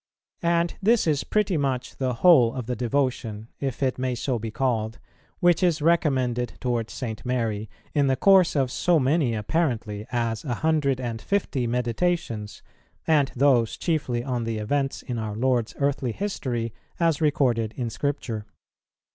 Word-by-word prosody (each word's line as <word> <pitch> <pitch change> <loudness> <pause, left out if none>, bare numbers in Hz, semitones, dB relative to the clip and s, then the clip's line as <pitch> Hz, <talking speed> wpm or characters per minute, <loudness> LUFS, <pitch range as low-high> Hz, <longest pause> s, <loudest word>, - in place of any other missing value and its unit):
And 170 0 +1
this 225 +3 +3
is 150 -4 +1
pretty 210 -5 +1
much 130 -3 -2
the 130 -2 -1
whole 130 -10 +7
of 125 -3 -4
the 125 +2 -2
devotion, 120 -3 -1
if 135 -1 -3
it 130 -1 0
may 130 -1 -1
so 120 0 -1
be 110 +1 -4
called, 110 -2 -1 0.4
which 175 -2 +4
is 175 -4 +2
recommended 130 -7 +1
towards 120 -3 -1
St. 110 -4 -5
Mary 115 -4 -2 0.2
in 145 -2 +3
the 135 - +3
course 185 +5 +5
of 135 -3 +1
so 175 +3 +2
many 135 -3 +2
apparently 110 -4 -1
as 115 -2 -1
a 125 -6 -2
hundred 145 -3 +1
and 115 -3 -4
fifty 145 -11 -1
Meditations, 120 - -1 0.4
and 145 -4 +3
those 125 -4 +3
chiefly 135 -8 -1
on 125 -2 -2
the 115 -1 -2
events 135 +6 -1
in 120 -2 -4
our 110 -2 -4
Lord's 120 -1 0
earthly 140 -4 0
history 120 - -3 0.3
as 165 -2 +2
recorded 125 -7 +2
in 120 -3 -2
Scripture. 115 -5 -3
130 Hz, 155 wpm, -25 LUFS, 115-150 Hz, 0.4 s, whole